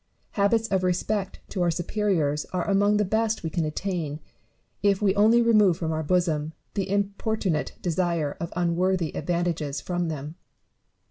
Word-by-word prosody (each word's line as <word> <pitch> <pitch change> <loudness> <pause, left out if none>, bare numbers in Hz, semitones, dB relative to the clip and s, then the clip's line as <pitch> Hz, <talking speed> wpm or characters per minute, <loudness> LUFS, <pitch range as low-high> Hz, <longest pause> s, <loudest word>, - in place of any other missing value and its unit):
Habits 220 +2 +2
of 190 -2 +1
respect 190 +2 -1
to 185 - -3
our 175 - +3
superiors 170 -4 0
are 180 -1 -3
among 205 +1 +3
the 210 - +2
best 220 +2 0
we 160 - -3
can 165 -1 0
attain, 155 -2 -3 0.6
if 200 -1 +3
we 200 -2 +3
only 220 +4 +5
remove 210 -7 +4
from 160 -3 -2
our 160 0 -1
bosom 160 -2 0 0.2
the 195 -1 -2
importunate 200 -3 -1
desire 170 -4 0
of 170 - -4
unworthy 175 -1 0
advantages 170 -5 -1
from 175 -1 -2
them. 155 +1 -5
180 Hz, 150 wpm, -26 LUFS, 160-200 Hz, 0.6 s, only